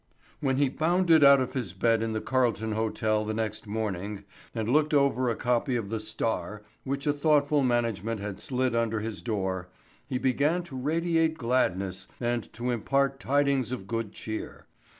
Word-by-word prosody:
When 135 -2 +1
he 140 +1 +3
bounded 165 +2 +3
out 140 0 +8
of 130 - -2
his 115 -10 -3
bed 115 +3 +2
in 115 -1 -1
the 110 - -2
Carlton 115 -4 0
Hotel 110 0 0
the 110 0 -3
next 110 -1 -3
morning 100 -1 -3 0.3
and 110 -2 -2
looked 150 +4 +3
over 130 -3 +3
a 115 - 0
copy 125 +2 0
of 110 -4 -2
the 110 0 -2
Star 110 -1 -3 0.2
which 140 +1 -3
a 145 - +3
thoughtful 145 -1 +3
management 115 -4 0
had 100 -1 -5
slid 130 -2 0
under 115 -2 0
his 110 -2 -5
door, 95 -5 -2 0.4
he 130 - -1
began 145 +7 +1
to 165 -6 -10
radiate 160 +3 +1
gladness 100 - 0
and 120 -1 -2
to 120 +2 -2
impart 135 +4 +1
tidings 140 -3 +1
of 125 -7 -4
good 115 -1 -3
cheer. 110 0 -6
120 Hz, 170 wpm, -28 LUFS, 110-140 Hz, 0.4 s, out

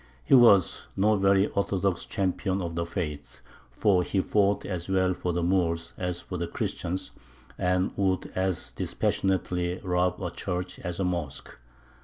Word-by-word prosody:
He - - +1
was 115 -8 +6
no 105 +2 +4
very 95 0 +4
orthodox 100 -3 -1
champion 95 0 -1
of 85 -3 -3
the 85 0 -2
faith, 75 -5 -5 0.3
for 90 - +2
he 95 +2 -1
fought 100 +1 +2
as 90 -2 -4
well 95 -1 +2
for 90 0 -2
the 85 0 -1
Moors 85 -2 0
as 90 -1 -3
for 90 - -6
the 85 0 -2
Christians, 90 +2 -3 0.4
and 90 +1 +1
would 95 -2 +1
as 95 -1 -1
dispassionately 90 -1 -1
rob 90 0 +1
a 90 -3 -3
church 90 0 -4
as 85 +1 -4
a 95 - +1
mosque. 85 -6 -4
90 Hz, 155 wpm, -27 LUFS, 85-95 Hz, 0.4 s, was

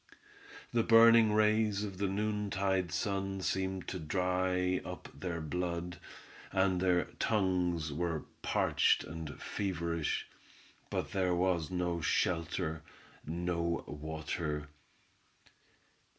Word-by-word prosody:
The 120 - +4
burning 115 -1 +7
rays 105 -1 +3
of 95 -3 -6
the 100 - +1
noontide 100 -2 0
sun 95 -2 -1
seemed 95 0 -1
to 90 - -4
dry 90 +2 0
up - - -7
their 85 -3 -4
blood, 85 +2 -3 0.5
and 95 -1 +2
their 90 -2 +3 0.2
tongues 90 -7 +1
were 85 0 -1 0.2
parched - - +2
and 80 -2 -7
feverish, 85 -5 -2 0.6
but - - -2
there 95 -3 +1
was 90 -3 +1
no 90 -2 -1
shelter; 80 -2 0 0.5
no 85 0 -1
water. 75 0 -4
90 Hz, 100 wpm, -33 LUFS, 85-95 Hz, 0.6 s, burning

